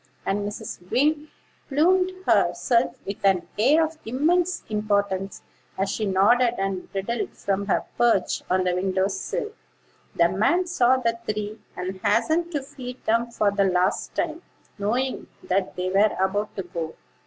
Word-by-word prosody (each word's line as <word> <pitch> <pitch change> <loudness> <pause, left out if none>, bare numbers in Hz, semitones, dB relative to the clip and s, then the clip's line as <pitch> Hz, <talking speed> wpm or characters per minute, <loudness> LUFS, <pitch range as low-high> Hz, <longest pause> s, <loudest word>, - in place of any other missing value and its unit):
And 195 +1 0
Mrs. 180 -3 -8
Wing 295 +5 +2 0.4
plumed 365 +6 +3
herself 235 -1 +2
with 200 - -6
an 190 -3 +3
air 300 +8 +5
of 315 0 -8
immense 335 +9 +1
importance, 200 -2 -1 0.3
as 195 +1 0
she 215 - -2
nodded 230 +6 +4
and 195 -2 -3
bridled 200 +4 -3
from 200 0 -1
her - - +1
perch 230 -6 +2
on 185 0 +2
the 180 -1 +1
window 190 +1 +1
sill. 410 - -3 0.6
The 170 - +5
man 220 - +2
saw 260 -8 +3
the 230 -2 -1
three, 215 +1 -3 0.2
and 185 +1 -5
hastened 340 +2 +2
to 290 -3 -1
feed 260 -3 -9
them 230 +2 +2
for 210 -3 +1
the 200 0 +2
last 185 +1 0
time, 330 0 -2 0.4
knowing 245 +6 -1 0.2
that 190 +1 -1
they 180 0 -2
were 205 +3 +3
about 205 +2 0
to 195 - -3
go. 170 -2 -5
210 Hz, 155 wpm, -24 LUFS, 190-265 Hz, 0.6 s, air